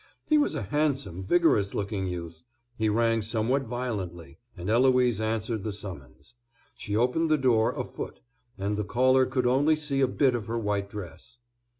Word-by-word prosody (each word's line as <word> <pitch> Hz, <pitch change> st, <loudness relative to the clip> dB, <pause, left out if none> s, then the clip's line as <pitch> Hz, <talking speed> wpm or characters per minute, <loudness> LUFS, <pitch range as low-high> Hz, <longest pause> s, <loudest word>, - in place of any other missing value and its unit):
He 305 Hz, -1 st, +4 dB
was 290 Hz, -, +1 dB
a -, -, -2 dB
handsome 140 Hz, -, -1 dB
vigorous 105 Hz, -, +2 dB
looking 100 Hz, -1 st, -2 dB
youth. 85 Hz, -2 st, -6 dB, 0.3 s
He 110 Hz, -2 st, 0 dB
rang 115 Hz, +1 st, +2 dB
somewhat 115 Hz, +5 st, 0 dB
violently; 95 Hz, -, -5 dB, 0.2 s
and 90 Hz, +1 st, -6 dB
Eloise 125 Hz, -1 st, +3 dB
answered 110 Hz, 0 st, -1 dB
the 110 Hz, -, -3 dB
summons. 95 Hz, -, -9 dB, 0.4 s
She 105 Hz, -, -4 dB
opened 125 Hz, +8 st, +1 dB
the 155 Hz, -, +4 dB
door 120 Hz, -5 st, +2 dB
a -, -, 0 dB
foot, -, -, -7 dB, 0.4 s
and 100 Hz, +1 st, -2 dB
the 105 Hz, -, -1 dB
caller 130 Hz, +4 st, +3 dB
could 130 Hz, -1 st, -1 dB
only 140 Hz, +5 st, +3 dB
see 150 Hz, -3 st, -1 dB
a 135 Hz, -, +4 dB
bit 130 Hz, 0 st, +2 dB
of 115 Hz, -3 st, -3 dB
her 115 Hz, +1 st, -2 dB
white 105 Hz, -3 st, -1 dB
dress. 105 Hz, +5 st, -9 dB
115 Hz, 175 wpm, -27 LUFS, 100-130 Hz, 0.4 s, He